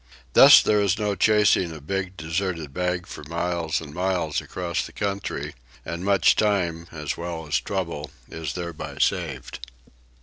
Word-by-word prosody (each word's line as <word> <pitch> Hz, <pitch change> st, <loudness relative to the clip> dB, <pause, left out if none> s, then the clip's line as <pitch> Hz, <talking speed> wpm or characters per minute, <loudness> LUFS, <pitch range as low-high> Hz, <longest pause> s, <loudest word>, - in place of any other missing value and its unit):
Thus -, -, +9 dB
there 105 Hz, -1 st, +3 dB
is 100 Hz, -1 st, +2 dB
no 105 Hz, -1 st, 0 dB
chasing 105 Hz, -3 st, +3 dB
a 80 Hz, -, -8 dB
big 95 Hz, +5 st, -4 dB
deserted 80 Hz, -2 st, -3 dB
bag 90 Hz, +1 st, -1 dB
for 75 Hz, -, -9 dB
miles 85 Hz, 0 st, -1 dB
and 75 Hz, -2 st, -9 dB
miles 90 Hz, -3 st, -1 dB
across 85 Hz, -2 st, -3 dB
the -, -, -9 dB
country, 100 Hz, -1 st, -3 dB, 0.3 s
and 85 Hz, +1 st, -5 dB
much 100 Hz, 0 st, +4 dB
time, 85 Hz, -6 st, 0 dB
as 75 Hz, -3 st, -4 dB
well 85 Hz, -1 st, -5 dB
as 75 Hz, -2 st, +1 dB
trouble, 85 Hz, -6 st, -4 dB, 0.2 s
is 80 Hz, -2 st, -5 dB
thereby 85 Hz, -3 st, -6 dB
saved. -, -, -1 dB
85 Hz, 155 wpm, -24 LUFS, 80-95 Hz, 0.3 s, Thus